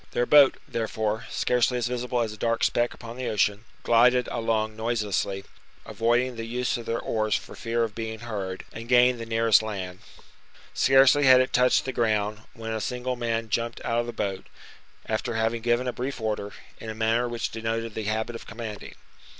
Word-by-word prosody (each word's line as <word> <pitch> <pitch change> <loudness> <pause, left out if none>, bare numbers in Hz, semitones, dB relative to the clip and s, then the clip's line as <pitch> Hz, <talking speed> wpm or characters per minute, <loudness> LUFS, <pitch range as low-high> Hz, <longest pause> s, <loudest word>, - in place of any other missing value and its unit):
Their 120 - +1
boat, 145 -1 +6
therefore, 110 -1 -2
scarcely 125 0 +1
as 120 - -1
visible 125 0 -1
as 110 -2 -2
a - - -11
dark 115 +1 0
speck 120 0 +1
upon 115 0 -10
the 130 - -3
ocean, 105 0 +1 0.2
gilded 125 +1 +4
along 110 -2 -1
noiselessly, 105 -4 -2 0.4
avoiding 120 +2 +1
the 115 - -4
use 125 +1 -1
of 120 - -6
their 115 - -1
oars 110 -1 0
for - - -5
fear 115 0 -1
of 110 -2 -3
being 110 0 -5
heard, 100 -5 -5
and 115 +1 -8
gained 125 0 +5
the 115 - -6
nearest 115 -1 +4
land. 95 -4 -5 0.7
Scarcely 135 +1 +5
had 130 -1 +8
it 130 - 0
touched 125 0 +3
the 130 - -3
ground 110 -2 0 0.2
when 115 0 -6
a 110 -1 -2
single 125 +2 -2
man 115 -2 -2
jumped 115 +2 -1
out 115 0 +1
of 120 - -2
the - - -3
boat, 95 -4 -4 0.6
after 110 +1 -2
having 115 +1 0
given 120 +2 +1
a 125 - -1
brief 130 +1 -4
order, 105 -2 -3 0.3
in 110 - -7
a 110 - -5
manner 115 +2 +1
which 120 -1 -3
denoted 115 0 -3
the 110 - -4
habit 110 +2 -2
of - - -9
commanding. 110 -2 -7
115 Hz, 190 wpm, -26 LUFS, 110-120 Hz, 0.7 s, had